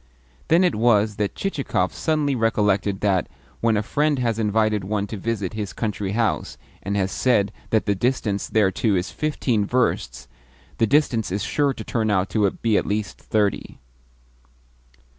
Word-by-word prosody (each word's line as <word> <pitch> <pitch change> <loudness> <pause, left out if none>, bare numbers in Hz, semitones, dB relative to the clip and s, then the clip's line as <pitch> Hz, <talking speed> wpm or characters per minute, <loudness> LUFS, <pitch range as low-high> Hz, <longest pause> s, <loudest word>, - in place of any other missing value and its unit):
Then 170 +3 +4
it 180 - +3
was 105 -2 +2
that 105 -1 -1
Chichikov 135 - -1
suddenly 155 -3 0
recollected 105 -4 +1
that, 95 -3 +1 0.3
when 115 -2 +2
a 105 - 0
friend 150 +6 +1
has 115 -3 -1
invited 110 -1 +1
one 100 +1 -1
to 105 - -6
visit 105 -2 -3
his 105 -3 -4
country 105 -3 -3
house, 115 -1 -1 0.2
and 100 +1 -2
has 95 -1 0
said 105 -4 +2 0.2
that 110 - +1
the 100 - +2
distance 105 -2 -1
thereto 100 0 +2
is 90 0 -2
fifteen 130 -8 0
versts, 125 +4 -1 0.5
the 115 - +3
distance 120 -7 +2
is 100 +2 -1
sure 140 -2 0
to 110 - -7
turn 110 -2 -1
out 95 -2 +1
to 105 -3 +2
be 110 +2 0
at - - -1
least 105 -1 -2
thirty. 105 -2 -1
110 Hz, 160 wpm, -23 LUFS, 100-120 Hz, 0.5 s, Then